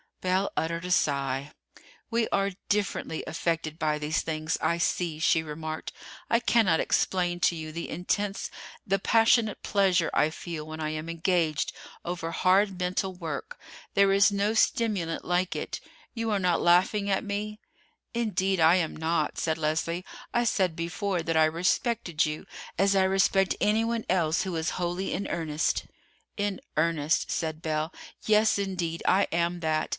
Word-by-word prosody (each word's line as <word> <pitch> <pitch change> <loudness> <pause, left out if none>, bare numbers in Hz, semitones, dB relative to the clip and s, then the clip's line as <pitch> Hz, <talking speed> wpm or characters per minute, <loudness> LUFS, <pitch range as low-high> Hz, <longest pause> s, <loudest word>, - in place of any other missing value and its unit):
Belle 185 +2 +1
uttered 170 +2 -2
a 180 - -3
sigh. 140 -3 +1 0.6
"We 230 0 +1
are 195 0 +1 0.2
differently 200 -5 -1
affected 165 -1 -2
by 155 -1 +1
these 150 +1 -1
things, 155 0 -2
I 170 - +1
see," 170 -2 0
she 160 +1 +3
remarked. 155 0 -5 0.4
"I 230 - +4
cannot 225 -8 +3
explain 175 -2 +1
to 170 - +3
you 155 -1 -6
the 170 +2 -5
intense, 195 +4 -2 0.4
the 195 +1 +2
passionate 225 +1 +3
pleasure 185 -4 +2
I 150 - +3
feel 160 -2 -6
when 155 0 -7
I 155 -1 -2
am 155 +1 -4
engaged 165 -2 0 0.3
over 170 -1 -3
hard 190 +2 +2
mental 185 +1 -1
work. 165 -6 -6 0.4
There 195 0 +5
is 200 +1 +5
no 200 +2 +1
stimulant 205 -8 +1
like 180 +1 0
it. - - -4 0.3
You 230 -1 -2
are 205 - +1
not 180 -2 +1
laughing 190 +4 +3
at 195 - +1
me?" 210 +1 -4 0.5
"Indeed 195 -5 0
I 160 +2 +6
am 170 -4 0
not," 160 -1 -1
said 160 -1 0
Leslie. 165 +3 -1 0.3
"I 240 - +2
said 185 -6 +1
before 180 +2 -2
that 165 -1 0
I 160 - +6
respected 170 +1 +1
you 150 0 -5 0.3
as 195 +2 +3
I 190 - +4
respect 195 0 +3
anyone 225 +2 +1
else 165 -3 +2
who 185 -3 -3
is 160 0 -1
wholly 175 +2 -2
in 200 - -2
earnest." 160 -2 -1 0.5
"In 205 -2 -1 0.2
earnest," 155 -1 +1
said 160 -1 -2
Belle; 155 0 -1 0.3
"yes, 215 0 +4
indeed, 180 -4 -2
I 195 +2 +5
am 170 +1 0
that. 155 -1 0
175 Hz, 160 wpm, -27 LUFS, 160-195 Hz, 0.6 s, I